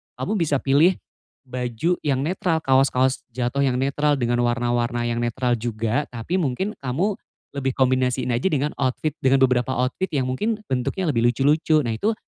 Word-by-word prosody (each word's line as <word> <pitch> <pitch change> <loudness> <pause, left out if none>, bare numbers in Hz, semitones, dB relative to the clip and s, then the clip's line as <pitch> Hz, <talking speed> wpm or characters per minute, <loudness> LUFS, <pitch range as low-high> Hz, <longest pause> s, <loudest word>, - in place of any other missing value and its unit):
kamu 210 +2 -2
bisa 145 -4 0
pilih, 155 +7 +4 0.5
baju 125 +6 -2
yang 135 -2 +1
netral 165 -1 0
kaos-kaos 130 -1 +2
jatuh 130 +3 0
yang 125 -2 +1
netral 145 +2 +1
dengan 120 -2 0
warna-warna 120 0 0
yang 115 - -2
netral 120 +1 0
juga 115 +4 -1
tapi 125 +11 -3
mungkin 170 +7 -1
kamu, 165 +11 -1 0.3
lebih 135 -2 -2
kombinasiin 130 -1 +1
aja 120 +10 +1
dengan 150 -3 0
outfit 135 +3 0
dengan 135 0 +3
beberapa 125 0 +2
outfit 125 +10 -1
yang 135 - +1
mungkin 215 - -1 0.2
bentuknya 155 +8 -1
lebih 115 -2 +1
lucu-lucu 150 +5 +2
nah 115 - -2
itu, 220 +2 +1
130 Hz, 160 wpm, -23 LUFS, 120-150 Hz, 0.5 s, pilih